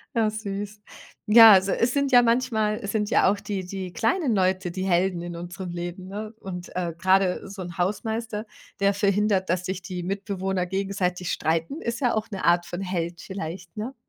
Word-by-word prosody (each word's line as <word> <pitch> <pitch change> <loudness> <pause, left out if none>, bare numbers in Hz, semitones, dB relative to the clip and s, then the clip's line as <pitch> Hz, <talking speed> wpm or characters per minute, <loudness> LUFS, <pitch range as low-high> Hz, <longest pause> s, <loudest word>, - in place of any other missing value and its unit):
Ja, 225 -2 +3
süß. 205 -1 -5 0.5
Ja, 225 0 +10
also, 190 0 +4
es 235 +2 +1
sind 280 -1 +1
ja 245 -1 +8
manchmal 230 -3 +1
es 200 - -3
sind 210 -1 -1
ja 190 - +4
auch 205 - -2
die 195 -2 -4
die 185 0 -6
kleinen 240 - +1
Leute, 185 -1 +1
die 185 +2 -4
Helden 180 -1 +1
in 175 0 -6
unserem 175 +1 -6
Leben, 175 +2 -6
ne? 210 +3 -6
Und, 180 -2 -7
äh, 175 -2 -2
grade 185 +1 +2
so 195 -1 -8
'n 175 -1 -8
Hausmeister, 220 +3 -2 0.3
der 200 0 +3
verhindert, 200 -1 +1
dass 180 +1 0
sich 185 0 -3
die 180 -1 -5
Mitbewohner 190 -1 -2
gegenseitig 190 -2 -2
streiten. 165 - -1
Ist 235 0 -3
ja 245 -4 +2
auch 220 0 -2
'ne 195 -3 -4
Art 175 0 +3
von 175 +2 -5
Held 175 -2 -3
vielleicht, 175 -2 -7
ne? 230 +6 -5
195 Hz, 190 wpm, -25 LUFS, 180-215 Hz, 0.5 s, Ja